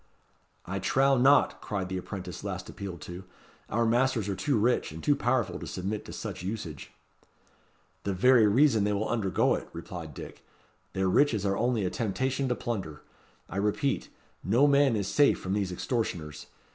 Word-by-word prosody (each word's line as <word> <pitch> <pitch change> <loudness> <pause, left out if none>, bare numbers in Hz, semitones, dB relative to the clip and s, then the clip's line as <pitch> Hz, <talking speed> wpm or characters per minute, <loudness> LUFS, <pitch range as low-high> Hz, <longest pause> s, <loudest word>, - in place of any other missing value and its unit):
"I 100 +2 -3
trow 135 +8 +3
not," 135 +2 +4
cried 95 -3 -3
the 95 0 -3
apprentice 90 -1 -7
last 95 -2 -4
appealed 95 -5 -7
to. 90 +1 -8 0.5
"Our 115 +1 +1
masters 120 -2 +2
are 100 - -1
too 115 +8 0
rich 120 -2 +1
and 80 +1 -9
too 145 - +3
powerful 130 -3 0
to - - -7
submit 100 +3 -4
to - - -9
such - - -6
usage." 90 - -6 1.1
"The 100 - -2
very 115 +4 +5
reason 115 0 +4
they 105 0 +1
will 105 +2 -1
undergo 100 -6 +1
it," - - -4
replied 85 -3 -8
Dick. - - -10 0.5
"Their 95 0 0
riches 110 0 +3
are 100 0 +1
only 120 -2 +1
a 90 - -1
temptation 130 +4 -1
to 125 - +1
plunder. 95 -13 -5 0.4
I 95 - -6
repeat, 105 +7 0 0.3
no 120 +9 +4
man 140 -3 +4
is 100 -3 -1
safe 145 +7 +3
from 95 - -3
these 100 -3 -1
extortioners. 90 - -3
105 Hz, 170 wpm, -28 LUFS, 95-125 Hz, 1.1 s, very